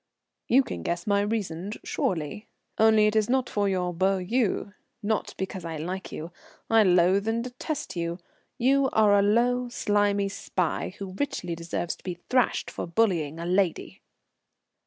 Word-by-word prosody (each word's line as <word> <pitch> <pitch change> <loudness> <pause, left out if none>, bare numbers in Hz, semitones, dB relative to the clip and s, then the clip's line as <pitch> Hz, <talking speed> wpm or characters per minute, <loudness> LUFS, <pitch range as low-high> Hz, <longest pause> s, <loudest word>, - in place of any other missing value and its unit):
"You 265 +3 +5
can 85 - -6
guess 170 - -2
my 200 -1 +2
reasons, 205 -2 -3
surely. 170 +4 -2 0.3
Only 220 -1 +6
it 210 0 +2
is 215 0 +2
not 260 -1 +2
for 205 -1 0
your 180 -2 -1
beaux 190 +3 +2
yeux; 200 +1 -1 0.3
not 215 +1 -1
because 190 -1 -4
I 165 -1 -4
like 180 +5 -5
you. 165 +3 -6 0.4
I 225 0 +6
loathe 185 +1 +4
and 230 +1 0
detest 255 - -5
you. 170 0 -2 0.4
You 265 +2 +3
are 215 -2 +5
a 200 - +5
low, 240 +4 +2
slimy 205 -3 +1
spy, 185 -1 -2
who 195 -2 -6
richly 180 -11 -2
deserves 170 +1 -3
to - - -24
be 180 -2 -4
thrashed 255 -1 +2
for - - -5
bullying 170 -5 +1
a 170 - -4
lady." 185 -1 0
200 Hz, 160 wpm, -27 LUFS, 175-225 Hz, 0.4 s, Only